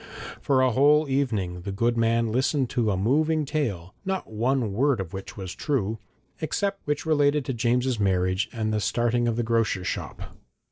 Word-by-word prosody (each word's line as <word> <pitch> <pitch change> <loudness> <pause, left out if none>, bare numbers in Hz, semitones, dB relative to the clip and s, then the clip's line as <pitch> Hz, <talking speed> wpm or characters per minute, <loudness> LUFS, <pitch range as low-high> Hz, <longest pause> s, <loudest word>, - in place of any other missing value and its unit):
For 135 -2 +2
a 130 - +3
whole 145 +4 +4
evening 110 -10 -1
the 100 +2 -5
good 115 +4 +1
man 115 0 +1
listened 130 +2 +1
to 115 -3 +1
a 95 - 0
moving 150 +9 +2
tale, 105 - -3
not 190 -1 -2
one 115 0 0
word 135 +2 +2
of 95 -1 -5
which 95 +2 -7
was 95 -2 -6
true, 110 -7 -1 0.4
except 195 +5 -1
that - - -39
which 150 +1 -1
related 145 -2 +2
to 130 - -2
James's 125 +1 0
marriage 95 -1 +1
and 110 -3 -2
the 105 - 0
starting 120 +4 +1
of 115 - 0
the 120 - 0
grocer's 110 -5 0
shop. - - -4
120 Hz, 185 wpm, -25 LUFS, 105-140 Hz, 0.4 s, whole